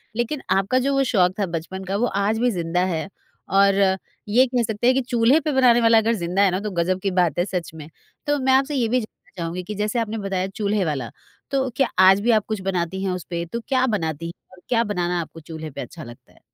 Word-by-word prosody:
लेकिन 240 +5 -2
आपका 195 +7 +2
जो 275 +2 0
वो 275 0 +3
शौक 185 -7 +2
था 200 - +2
बचपन 190 +4 -5
का 190 +1 -3
वो 240 - +1 0.2
आज 220 +2 +1
भी 245 0 +2
ज़िंदा 175 0 -1
है। 160 +4 -3 0.5
और 195 0 +5 0.6
ये 250 +5 +5
कह 245 -1 0
सकते 220 +2 -1
हैं 255 - +6
कि 270 - +2
चूल्हे 245 +4 +3
पे 305 0 -2
बनाने 245 -3 +5
वाला 230 0 +5
अगर 225 +1 +3
ज़िंदा 180 +1 -1
है 195 -2 +4
ना 185 - -1
तो 210 -1 -4
ग़ज़ब 180 +1 0
की 195 - 0
बात 175 -3 +1
है 175 - +2
सच 180 -5 -4
में। 155 -1 -9 0.4
तो 290 0 +2
मैं 260 0 +2
आपसे 275 +2 +2
ये 240 -4 +1
भी 250 +3 +2
जानना 215 - -14
चाहूँगी 170 +2 -4
कि 210 +4 -6
जैसे 210 +3 -1
आपने 225 0 -2
बताया 195 -2 -2
चूल्हे 205 0 -1
वाला, 135 -7 -2 0.4
तो 265 -1 0
क्या 270 -1 +2 0.2
आज 195 +1 +6
भी 235 +2 +2
आप 215 -2 +2
कुछ 215 -3 -3
बनाती 185 +1 -2
हैं 190 - 0
उस 180 -2 -4
पे? 170 -1 -3
तो 235 +8 -5
क्या 260 -1 +2
बनाती 165 -6 -2 0.2
और 185 -1 -17
क्या 230 -2 +3
बनाना 180 -4 -1
आपको 165 0 -10
चूल्हे 160 0 -8
पे - - -6
अच्छा 165 - -9
लगता 120 0 -14
है? - - -24
200 Hz, 250 wpm, -22 LUFS, 180-240 Hz, 0.6 s, हैं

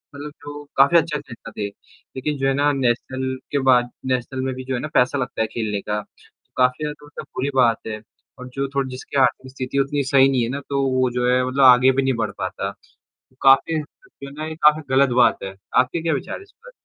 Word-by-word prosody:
मतलब 145 +1 -7
जो 145 0 -8
काफ़ी 140 +5 +6
अच्छा 160 -2 0
खेलता 115 -4 -11
थे। 105 - -2
लेकिन 130 +7 -7
जो 135 0 0
है 135 - +2
ना 145 +1 +2
नेशनल 130 0 -1 0.2
के 145 - +1
बाद 120 -1 +4 0.2
नेशनल 130 0 -2
में 130 - -2
भी 130 - -7
जो 130 - -3
है 125 - -1
ना - - -4
पैसा 130 +3 +3
लगता 125 -3 -3
है 110 - +1
खेलने 110 -3 -3
का, 105 0 -3
तो - - -26
काफ़ी 125 +3 +2
ज़्यादा 150 0 -5
होता 145 - -9
बुरी 135 +2 -1
बात 120 -4 +4
है 110 -1 -5 0.4
और 125 - -8
जो 140 0 -2
थोड़ी 135 -1 0
जिसकी 130 +2 -6
आर्थिक 130 0 +1
स्थिति 130 +1 -3
उतनी 140 +1 0
सही 135 0 +4
नहीं 130 -3 +1
है 115 - -2
ना, 140 - -3
तो 140 -1 0
वो 130 -1 +1
जो 125 0 0
है 125 0 +2
मतलब 135 +2 +1
आगे 125 0 +7
भी 135 +1 0
नहीं 135 0 +1
बढ़ 105 - -3
पाता। - - -4 0.7
काफ़ी 135 +4 +5
जो 150 - -13
है - - -11
ना, 155 +2 -6
ये 160 - -5
काफ़ी 150 0 +4
गलत 135 +1 +5
बात - - +3
है। 95 0 -6 0.2
आपके 130 +6 +2
क्या 165 -1 0
विचार 135 - -4
हैं - - -11
इस 400 - -19
पर? - - -16
135 Hz, 240 wpm, -21 LUFS, 125-145 Hz, 0.7 s, आगे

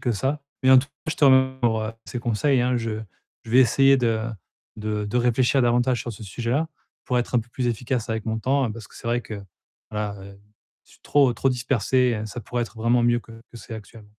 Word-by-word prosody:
que 120 - 0
ça 135 +8 -1 0.2
mais 130 - +5
en 130 - +9
tout 130 - 0
cas, 155 - -8
je - - -4
te 150 - +3
m 130 -1 +5
pour, 110 -2 +2
heu, 110 +1 -4
ces 125 - -5
conseils 120 +3 +1
hein. 125 0 +1
Je 115 -1 -2 0.5
je 110 - -9
vais 125 - +5
essayer 135 +2 +5
de 115 -3 +1 0.5
de 105 -1 -2
de 105 +4 -2
réfléchir 125 +2 +3
davantage 120 0 +2
sur 120 - -5
ce 110 - -11
sujet-là 120 - -1 0.4
pour 125 -2 +1
être 120 +1 -3
un - - +5
peu 115 - -13
plus 125 +1 -3
efficace 120 +1 -2
avec 110 0 -3
mon 110 0 -1
temps, 135 +4 +1
hein, 115 - -1
parce 110 -1 -9
que - - -20
c'est - - -10
vrai 120 +1 +1
que, 105 -4 -8 0.5
voilà, 105 -1 -3
heu, 100 0 -12 0.5
je - - -26
suis - - -22
trop, 140 -4 +3
trop 135 - 0
dispersé 125 -1 +1
et 110 - -4
ça 110 +3 -7
pourrait 120 +3 -2
être 115 - -8
vraiment 120 +2 +2
mieux 120 0 +3
que 115 - -15
que 115 +1 -15
c'est 115 - -9
actuel 110 0 -11
120 Hz, 245 wpm, -24 LUFS, 110-130 Hz, 0.5 s, en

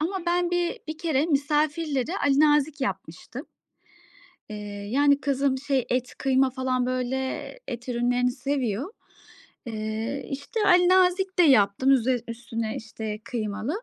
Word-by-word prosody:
ama 360 +3 -2
ben 350 0 +1
bir 350 -1 0
bir 310 0 -5
kere 315 -3 +1
misafirlere 300 +1 0
alinazik 295 +1 +3
yapmıştım. 265 - -5 1.0
Eee, 210 - -5 0.3
yani, 285 +2 +3
kızım 275 -1 0
şey 270 -2 -1
et, 250 0 -1
kıyma 265 0 +2
falan 255 -1 -1
böyle 255 0 -1 0.5
et 245 0 -6
ürünlerini 245 +1 +1
seviyor. 260 - -2 0.7
Eee, 220 +4 -4
işte, 285 - -4
alinazik 365 +1 +4
de - - +7
yaptım 255 -2 +4
üzer 255 -1 +2
üstüne, 230 -1 -4
işte, 220 -1 -6
kıymalı. 225 - -3
270 Hz, 120 wpm, -25 LUFS, 245-310 Hz, 1.0 s, de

